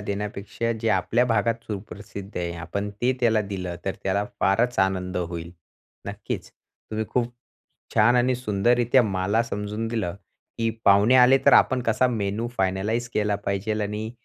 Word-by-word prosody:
देण्यापेक्षा 100 +2 -3
जे 115 - 0
आपल्या 110 +5 +2
भागात 115 0 0
सुप्रसिद्ध 100 -1 -8
आहे 85 -1 -2
आपण 100 +5 -4
ते 125 +2 +3
त्याला 115 -3 +3
दिलं 90 -2 -4
तर 95 - -2
त्याला 100 +2 0 0.2
फारच 115 +5 +2
आनंद 95 -1 0
होईल. 85 -1 -4 0.6
नक्कीच, - - -5
तुम्ही 110 0 -7
खूप 120 -1 0 0.6
छान 120 +3 +5
आणि 125 +1 +3
सुंदररित्या 120 +2 +2
मला 100 +1 +1
समजून 105 0 -4
दिलं 110 -7 -2 0.4
की 115 0 +1
पाहुणे 100 +5 +5
आले 130 +1 +7
तर - - +7
आपण 130 - +5
कसा 115 +2 +2
मेनू 110 0 -2
फायनलाईज 100 +5 0
केला 105 -1 +1
पाहिजेल 105 +2 -1
आणि 105 +2 -3
105 Hz, 145 wpm, -24 LUFS, 100-115 Hz, 0.6 s, आले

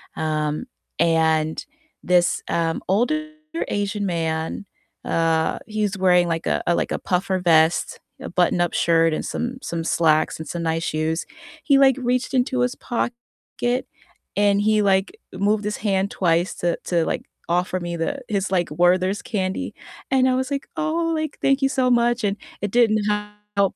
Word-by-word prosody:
um, 155 +5 -1 0.3
and 160 -1 +2 0.4
this, 175 -1 +2
um, 165 -1 0
older 300 +11 +1 0.4
Asian 205 0 -1
man 165 +1 -2 0.4
uh, 165 -1 +1
he's 210 -2 -1
wearing 180 -2 +4
like 165 -1 -2
a - - +1
like 175 - +1
a - - -1
puffer 185 +1 0
vest, 165 -1 +3 0.2
a - - -6
button-up 175 -1 +1
shirt, 165 -1 +3
and - - -3
some 245 +2 -3
some 170 -7 -3
slacks, 155 -2 +2
and 160 - -7
some 170 - -4
nice 165 0 -1
shoes. 160 +1 -1 0.4
He, 280 -3 +4
like, 270 -2 +6
reached 250 +1 -1
into 255 0 +1
his 245 0 0
pocket, 240 0 -2 1.2
and 205 0 +3
he, 215 0 +3
like, 195 - +1 0.2
moved 210 +2 +1
his 210 - -2
hand 195 -1 0
twice 175 0 +1
to 175 -1 -1
to, 170 -2 +1
like, - - -2 0.3
offer 180 +1 0
me 175 -1 -4
the 170 +12 -2
his, 200 -2 -1
like, 180 -2 +1
Werther's 185 +4 +2
candy, 190 -3 -2 0.4
and 260 -1 +4
I 255 - +2
was, 260 +2 -2
like, 275 -1 -3
"Oh," 330 +1 0
like, 310 -2 -3
"thank 275 +1 +2
you 270 - +3
so 260 -2 +1
much." 240 0 +2
And 200 -1 0 0.3
it 205 - -1
didn't 225 -3 +4 0.6
help. 200 -2 +2
190 Hz, 160 wpm, -22 LUFS, 170-240 Hz, 1.2 s, like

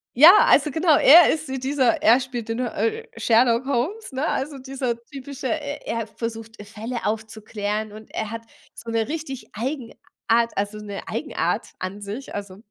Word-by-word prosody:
ja, 305 +8 +10 0.2
also, 300 - +4
genau, 320 -1 +3
er 335 +4 +8
ist 315 0 -3
wie 265 -1 -3
dieser 265 -2 +1
er 230 +4 +6
spielt 245 -3 -6
den, 225 +2 -2
äh, 225 -2 -2
Sherlock 230 +2 +3
Holmes, 280 - -2
ne, 270 +4 -2
also, 280 +1 -2
dieser 260 -2 -3
typische, 275 -1 -7
e 290 0 -3
er 230 -1 -3
versucht 225 0 -6
Fälle 225 +3 -6
aufzuklären 215 -1 -3
und 215 +1 -12
er 220 0 -3
hat 230 0 -5 0.3
so 230 - -9
'ne 225 -1 0
richtig 295 -4 -5
Eigenart 250 +2 -5 0.6
also, 205 +1 -2
'ne 205 -1 -7
Eigenart - - -2
an 190 +2 -6
sich. 210 +7 -7
Also, 200 -2 -6
235 Hz, 165 wpm, -23 LUFS, 220-275 Hz, 0.6 s, ja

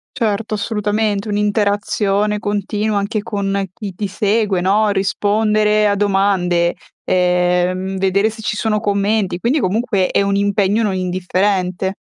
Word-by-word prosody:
Certo, 215 -3 -1
assolutamente, 210 0 -1
un'interazione 205 0 0
continua 205 +1 -1
anche 205 +1 -1
con 200 -3 -2
chi 200 -3 -7
ti 205 +2 -3
segue 205 -1 0
no, 205 +4 +2
rispondere 210 +2 +1
a 200 - +2
domande, 195 -4 +1 0.3
ehm, 180 +1 +1
vedere 195 +3 +2
se 220 0 -10
ci 215 - -2
sono 215 -1 0
commenti, 200 -2 0
quindi 260 +8 +1
comunque 200 -1 0
è - - +1
un 200 0 0
impegno 200 +2 +1
non 200 -3 0
indifferente. 185 +1 -1
205 Hz, 130 wpm, -18 LUFS, 190-210 Hz, 0.3 s, no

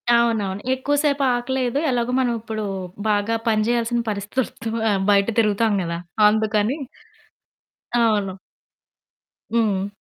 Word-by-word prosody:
అవునవును. 210 -4 +1
ఎక్కువ 280 +3 0
సేపు 285 -1 +1
ఆకలేయదు, 255 +1 -1
ఎలాగో 245 -1 0
మనం 245 -2 +1
ఇప్పుడు 220 -1 -4 0.4
బాగా 210 +2 +1
పని 215 -1 +3
జేయాల్సిన 240 0 +1
పరిస్థితి 205 +4 -5
తక్కువ 225 0 -6 0.4
బయట 200 +1 +4
తిరుగుతాం 215 0 +2
గదా 170 -1 -3 0.3
అందుకని. 215 +4 +1 1.2
అవును. 210 -5 +1 1.2
హ్మ్. 200 -4 +1
225 Hz, 110 wpm, -22 LUFS, 205-240 Hz, 1.2 s, బయట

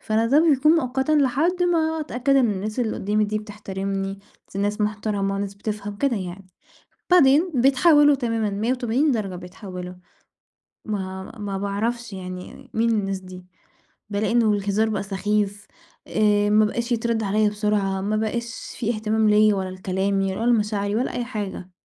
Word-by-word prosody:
فأنا 220 +1 +1
ده 285 +6 +5
بيكون 295 +3 +4
مؤقتًا 265 -2 +1
لحد 305 +6 +2
ما 320 -2 +1
أتأكد 275 -1 0
إن 245 -4 +4
الناس 210 +4 -3
اللي 225 -3 -1
قُدّامي 210 +2 +1
دي 215 +1 -1
بتحترمني، 195 -2 -4 0.4
دي 195 - -2
ناس 205 +1 -1
مُحترمة، 205 -2 -1
ناس 200 0 -4
بتفهم 205 0 -5
كده 265 -1 +1
يعني، 185 0 -6 0.7
بعدين 320 +1 +5
بيتحولوا 290 +3 +5
تمامًا 230 -4 -1
180 245 +6 0
درجة 200 -6 -2
بيتحوّلوا، 180 0 -8 0.9
ما 190 -3 -4
ما 200 -2 -3
باعرفش 215 +3 -2
يعني 185 -1 -8
مين 230 +1 +2
الناس 195 -3 0
دي؟ 185 -1 -11 0.7
بالاقي 210 +2 0
إنّه 230 -3 +3
الهزار 205 +2 +1
بقى 210 - -2
سخيف، 205 +1 -1 0.4
آآ، 205 -1 +2
ما 215 +1 +5
بقاش 235 +3 -2
يتردّ 230 -1 0
عليّا 210 +1 +2
بسُرعة، 205 -2 0
ما 210 +2 -1
بقاش 230 +2 -4
في 235 0 -1
اهتمام 215 0 +1
ليّا 210 0 +5
ولا 190 -1 -3
لكلامي، 190 +1 -1
ولا 235 +2 +1
لمشاعري، 210 -2 0
ولا 250 - -1
أي 245 -1 -2
حاجة. 205 -6 -5
210 Hz, 155 wpm, -23 LUFS, 195-235 Hz, 0.9 s, ده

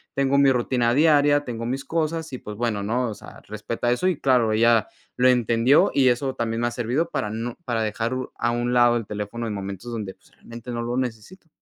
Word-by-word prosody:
tengo 140 0 +2
mi 140 -1 +5
rutina 120 -1 +1
diaria, 145 0 +4
tengo 115 -3 -5
mis 135 +3 -3
cosas 160 -1 -2
y 130 - -3
pues 105 -1 -8
bueno, 115 -3 -1
¿no? 120 +4 -1
O - - -5
sea: - - -13
"Respeta 110 +3 -3
eso", 125 +10 0
y 180 -5 0
claro 125 -5 +2
ella 115 -1 +3 0.3
lo 125 - +4
entendió, 120 +2 +3
y 135 -2 +3
eso 130 +2 0
también 115 0 -2
me 120 - +1
ha - - -2
servido 125 +7 -1
para 105 - -2
no 115 +3 -4
para 115 -2 -1
dejar 115 +3 -2
u 130 - -5
a 120 - 0
un 120 +1 -1
lado 120 -1 +4
el 115 - -4
teléfono 105 +3 -5
en 110 - -3
momentos 100 +3 -6
donde 105 -5 -5
pues 95 - -27
realmente 115 +1 -10
no 120 0 -3
lo 120 +1 -3
necesito. 130 - -5
120 Hz, 225 wpm, -23 LUFS, 115-130 Hz, 0.3 s, mi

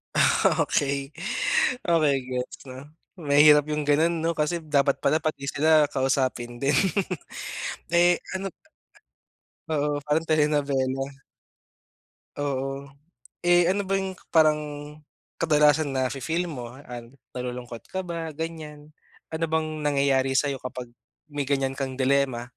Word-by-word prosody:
Ah, - - +3
okey. 140 -1 0 0.8
Okey, 155 -4 +4
gets 125 0 -4
na. 130 - -8 0.4
Mahirap 150 -1 +6
yung 150 0 0
ganun 160 +4 +4
'no 165 - +1
kasi 155 +3 +1
dapat 140 -3 +2
pala 155 - +3
pati 145 -3 -3
sila 155 0 +4
kausapin 130 -3 0
din. 140 +1 +2 1.2
Eh 175 +1 +5 0.2
ano 195 0 -3 1.2
Oo, 150 -1 0
parang 155 +2 0
telenobela. 140 -3 +1 1.3
Oo. 135 0 -3 0.6
Eh, 175 0 +5
ano 200 +1 0
ba 195 - -2
yung 190 -1 -4 0.2
parang 155 -2 +5 0.8
kadalasan 150 -2 +3
nafe-feel 135 +7 -1
mo, 120 -5 -7
ah, 125 -3 -9 0.3
nalulungkot 125 -1 -6
ka 190 - -4
ba, 165 -3 -5
ganyan? 155 -1 -7 0.4
Ano 160 +1 -1
bang 155 -1 -2
nangyayari 140 -2 +2
sa'yo 140 0 +1
kapag 125 -1 -7 0.4
may 145 -1 -3
ganyan 135 -1 0
kang 135 -2 -3
dilemma? 130 -2 +1
145 Hz, 115 wpm, -25 LUFS, 135-160 Hz, 1.3 s, Mahirap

